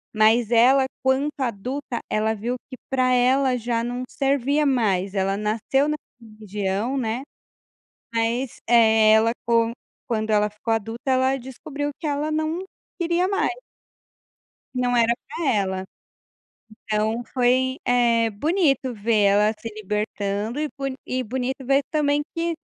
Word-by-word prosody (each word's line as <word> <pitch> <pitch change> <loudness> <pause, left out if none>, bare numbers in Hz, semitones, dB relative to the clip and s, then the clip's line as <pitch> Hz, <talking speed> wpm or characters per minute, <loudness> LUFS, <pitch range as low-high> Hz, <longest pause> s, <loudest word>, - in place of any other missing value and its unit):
Mas 220 +2 +4
ela 260 +3 +5 0.2
quanto 265 +3 +2
adulta, 250 +2 -3
ela 220 +1 +1
viu 240 +4 -3
que 255 - -9
para 255 -1 +2
ela 255 +1 +3
já 230 0 -1
não 245 +1 -3
servia 280 +2 +1
mais, 200 -7 +1
ela 195 0 +1
nasceu 220 +7 0
na 300 - 0 0.3
religião 210 +2 -3
né, 240 +1 -2 0.9
mas, 230 +3 0
eh, 220 -2 +6
ela 220 +1 +5
com 230 0 +2 0.4
quando 220 -1 -1
ela 210 -1 +3
ficou 210 +2 -3
adulta, 225 +5 -2
ela 260 +1 +3
descobriu 285 +3 -5
que 315 - -3
ela 295 +2 -1
não 315 +3 -1 0.3
queria 345 +1 +1
mais 395 0 +1 1.2
que - - -2
não 245 0 +1
era 235 0 +4
pra 315 +3 -4
ela. 190 -2 -1 1.0
Então 220 +2 0
foi, 260 +1 +2
eh, 235 -2 +3
bonito 275 - +1
ver 215 0 +1
ela 205 +2 +4
se 230 - -6
libertando 210 +3 -2
e 305 - -1
bo 275 - -2 0.2
e 255 0 -2
bonito 255 +3 -2
ver 275 +2 +3
também 295 -1 +1
que 335 0 0
240 Hz, 140 wpm, -23 LUFS, 220-270 Hz, 1.2 s, eh